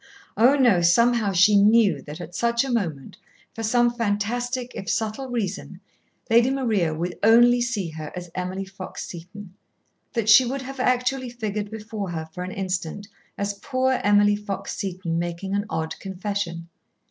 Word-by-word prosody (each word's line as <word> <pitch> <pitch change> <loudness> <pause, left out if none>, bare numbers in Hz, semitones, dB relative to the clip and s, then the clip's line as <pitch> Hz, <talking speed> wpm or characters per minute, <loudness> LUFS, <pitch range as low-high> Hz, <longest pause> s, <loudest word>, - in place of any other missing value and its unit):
Oh, 250 +5 +5
no! 240 -10 +4
Somehow 225 +4 +3
she 195 +3 +5
knew 210 +1 +4
that 150 +3 -9
at 175 0 -8
such 235 +5 +1
a 265 - -3
moment, 165 - -3 0.4
for 225 - -7
some 240 +2 +2
fantastic, 240 +3 -2
if 195 - -6
subtle, 220 +4 -2
reason, 225 -7 -4 0.5
Lady 235 +2 +4
Maria 225 -11 0
would 170 +3 -4
only 240 +2 +6
see 235 -7 -1
her 155 -1 -7
as 180 -1 -7
Emily 185 +1 -4
Fox 190 -1 -8
Seton, 180 +3 -10 0.6
that 230 -4 -1
she 220 +4 +8
would 265 +2 -3
have 270 +1 -8
actually 255 +1 0
figured 215 -3 -4
before 215 -2 -6
her 160 -2 -4
for 180 - -5
an 180 - -5
instant 185 +1 -4 0.3
as 200 0 -2
poor 260 +1 0
Emily 205 0 +4
Fox 205 -1 -5
Seton 180 -3 -3
making 175 +3 -4
an 205 +1 -1
odd 160 0 -3
confession. 190 -3 -4
205 Hz, 160 wpm, -24 LUFS, 180-240 Hz, 0.6 s, she